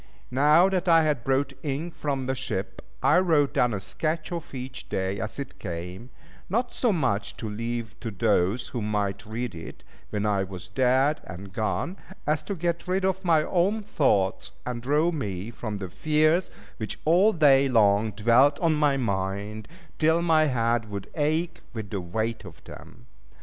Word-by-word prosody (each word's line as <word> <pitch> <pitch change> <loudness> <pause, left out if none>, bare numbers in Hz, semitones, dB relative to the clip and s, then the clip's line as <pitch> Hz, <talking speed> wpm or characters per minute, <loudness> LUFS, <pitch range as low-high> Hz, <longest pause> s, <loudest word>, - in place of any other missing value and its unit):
Now 150 +7 +5
that 190 -2 -1
I 165 -1 +6
had 150 -6 0
brought 135 +1 +1
ink 155 +4 -3
from 145 -4 -2
the 130 - 0
ship, 130 -7 -4 0.2
I 170 - +5
wrote 160 -6 +2
down 125 -1 +3
a 105 - -2
sketch 155 - -3
of 170 -2 -5
each 130 +1 -7
day 95 +1 -2
as 110 - -5
it 140 - -7
came; 90 +5 -6 0.4
not 240 +6 0
so 245 - +2
much 125 - -1
to 110 - -5
leave 115 +1 -4
to 115 - -4
those 100 +1 +1
who 120 - -4
might 105 0 -2
read 115 +1 -4
it, 80 -1 -10 0.3
when 105 0 -2
I 100 -2 +2
was 95 -1 -8
dead 130 +7 +2
and 90 +3 -9
gone, 120 - -2 0.3
as 150 +1 +1
to 200 - -1
get 170 +1 -2
rid 185 +1 +1
of 190 0 0
my 165 -4 +4
own 195 +6 +1
thoughts, 105 - +1
and 125 -1 -4
draw 150 +7 +2
me 105 - -4
from 110 -3 -5
the 95 -2 -6
fears 155 - +2 0.3
which 110 - -5
all 180 +7 +5
day 140 -6 +5
long 110 -2 +4
dwelt 120 +7 +4
on 165 -2 +2
my 150 -2 +2
mind, 100 -1 -2 0.3
till 160 +2 +3
my 160 -2 +4
head 115 -4 0
would 100 -1 -6
ache 160 +3 -1
with 110 -4 -6
the 100 - -2
weight 110 +6 -3
of 90 -6 -12
them. - - -13
130 Hz, 175 wpm, -26 LUFS, 105-155 Hz, 0.4 s, I